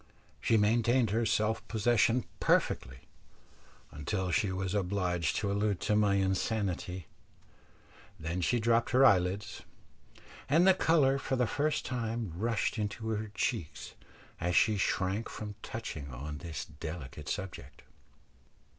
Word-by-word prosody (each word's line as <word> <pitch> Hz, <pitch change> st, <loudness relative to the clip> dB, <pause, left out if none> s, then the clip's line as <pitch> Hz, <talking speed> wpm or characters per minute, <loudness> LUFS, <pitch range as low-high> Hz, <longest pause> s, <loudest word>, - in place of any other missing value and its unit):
She 115 Hz, -, +3 dB
maintained 115 Hz, +2 st, +3 dB
her 115 Hz, +1 st, +1 dB
self 110 Hz, +1 st, 0 dB
possession 115 Hz, +2 st, +2 dB
perfectly 65 Hz, +2 st, +1 dB, 0.9 s
until 90 Hz, +6 st, -2 dB
she 95 Hz, +2 st, +1 dB
was 95 Hz, 0 st, -2 dB
obliged 90 Hz, -4 st, 0 dB
to 100 Hz, -, -1 dB
allude 100 Hz, -2 st, 0 dB
to 105 Hz, -, +1 dB
my 105 Hz, -2 st, +3 dB
insanity, 95 Hz, -2 st, -1 dB, 1.1 s
then 85 Hz, +3 st, -3 dB
she 120 Hz, +7 st, +2 dB
dropped 115 Hz, +1 st, +2 dB
her 130 Hz, +2 st, +6 dB
eyelids, 95 Hz, -2 st, +2 dB, 0.9 s
and 165 Hz, +6 st, +5 dB
the 190 Hz, -, +8 dB
colour 145 Hz, -7 st, +3 dB
for 135 Hz, -, -1 dB
the 125 Hz, -1 st, +2 dB
first 145 Hz, +6 st, -1 dB
time 115 Hz, -, -3 dB
rushed 115 Hz, +3 st, -1 dB
into 110 Hz, +2 st, -3 dB
her 110 Hz, -1 st, -2 dB
cheeks 95 Hz, -11 st, -3 dB, 0.5 s
as 90 Hz, +1 st, -1 dB
she 110 Hz, -1 st, +4 dB
shrank 95 Hz, +2 st, 0 dB
from 105 Hz, -1 st, -6 dB
touching 80 Hz, -11 st, -6 dB
on 75 Hz, +4 st, -6 dB
this 85 Hz, -2 st, -5 dB
delicate 75 Hz, -2 st, -7 dB
subject. 95 Hz, -3 st, -6 dB
105 Hz, 130 wpm, -31 LUFS, 90-115 Hz, 1.1 s, the